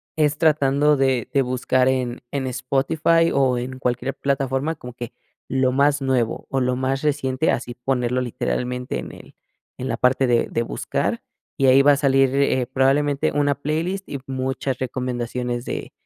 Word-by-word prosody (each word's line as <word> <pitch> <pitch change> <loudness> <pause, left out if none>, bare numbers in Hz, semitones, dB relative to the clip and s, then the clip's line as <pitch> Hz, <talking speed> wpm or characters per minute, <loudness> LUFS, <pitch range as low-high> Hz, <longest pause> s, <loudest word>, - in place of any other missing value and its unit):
es 150 -1 +1
tratando 150 -2 +3
de 130 -2 +1
de 140 - +4
buscar 130 0 +1
en 125 -2 -1
en 140 -2 -2
Spotify 150 +6 +1
o 130 -2 +2
en 130 +2 -5
cualquier 125 +2 -1
plataforma 140 +2 -1
como 125 -5 -10
que 120 -1 -7 0.4
lo 130 0 +2
más 140 +2 +2
nuevo 130 -4 0
o 135 - 0
lo 125 0 +1
más 130 +1 -1
reciente, 145 -1 0
así 120 0 -3
ponerlo 125 0 -1
literalmente 125 - -3
en - - -7
el - - -14 0.4
en 130 - -4
la 115 - -1
parte 130 +1 +2
de 120 -1 +2
de 115 - -1
buscar, - - -2 0.4
y 135 - +2
ahí 130 +1 +7
va 145 +1 +6
a 140 - +1
salir, 135 -2 +3
eh, 135 -2 +2
probablemente 140 +2 +1
una 145 -1 +2
playlist 165 +7 -3
y 140 - -3
muchas 130 0 -3
recomendaciones 125 -1 -3
de - - -5
130 Hz, 170 wpm, -22 LUFS, 125-140 Hz, 0.4 s, ahí